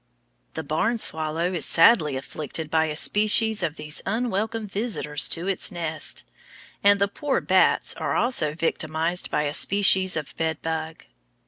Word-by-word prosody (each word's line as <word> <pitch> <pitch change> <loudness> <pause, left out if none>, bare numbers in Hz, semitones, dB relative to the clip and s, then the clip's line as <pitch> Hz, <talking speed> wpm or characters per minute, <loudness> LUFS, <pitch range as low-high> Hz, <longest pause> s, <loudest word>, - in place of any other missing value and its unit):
The - - -4
barn 190 +11 -1
swallow 160 -1 +1
is 165 -5 -1
sadly 165 - +4
afflicted 155 +3 -5
by 160 0 +2
a 155 -1 -4
species 215 +4 +3
of 160 -3 -2
these 150 -1 -4
unwelcome 225 0 -2
visitors 195 - -1
to 170 +2 -3
its 195 - -1
nest, 165 -3 -3 0.6
and 200 0 +5
the 200 - +2
poor 275 +6 -2
bats - - +2
are - - -3
also 155 - 0
victimized 165 +1 -2
by 150 - 0
a 145 -1 -2
species 190 0 +2
of 150 -2 -6
bed 160 -1 -2
bug. 160 0 -5
165 Hz, 150 wpm, -24 LUFS, 155-205 Hz, 0.6 s, and